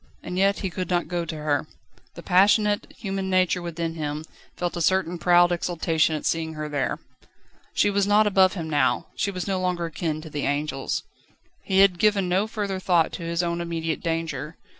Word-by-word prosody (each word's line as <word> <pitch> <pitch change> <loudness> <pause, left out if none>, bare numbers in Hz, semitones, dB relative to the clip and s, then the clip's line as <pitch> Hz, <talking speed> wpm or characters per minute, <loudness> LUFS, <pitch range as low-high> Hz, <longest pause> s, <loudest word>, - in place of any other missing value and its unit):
And 180 - -5
yet 195 +2 +2
he 190 -3 -2
could 185 +1 -4
not 175 -1 0
go 175 -1 -2
to 160 - -5
her. 150 0 -1 0.5
The 170 - -9
passionate, 205 +3 +3
human 195 -2 -3
nature 185 -1 +2
within 170 -1 -3
him 150 -1 -4 0.3
felt 175 0 -2
a 170 - -3
certain 180 0 +1
proud 175 0 +5
exultation 165 -2 +1
at 150 - -5
seeing 160 -1 -1
her 155 0 -4
there. 145 -3 -1 0.8
She 205 - +3
was 200 0 +1
not 210 +1 +5
above 190 -2 +4
him 165 -4 -4
now, 135 -6 +1
she 205 - 0
was 185 -2 -4
no 195 -2 -1
longer 180 -2 -1
akin 160 -1 -3
to 160 - -9
the 145 -1 -2
angels. 145 -1 -2 0.6
He 190 0 +3
had 190 -3 +4
given 205 -2 +3
no 190 +4 +1
further 205 -4 -3
thought 175 -3 +2
to 175 - -6
his 170 +1 -1
own 170 0 -1
immediate 165 -2 -3
danger. 165 -2 -3
175 Hz, 195 wpm, -25 LUFS, 160-190 Hz, 0.8 s, proud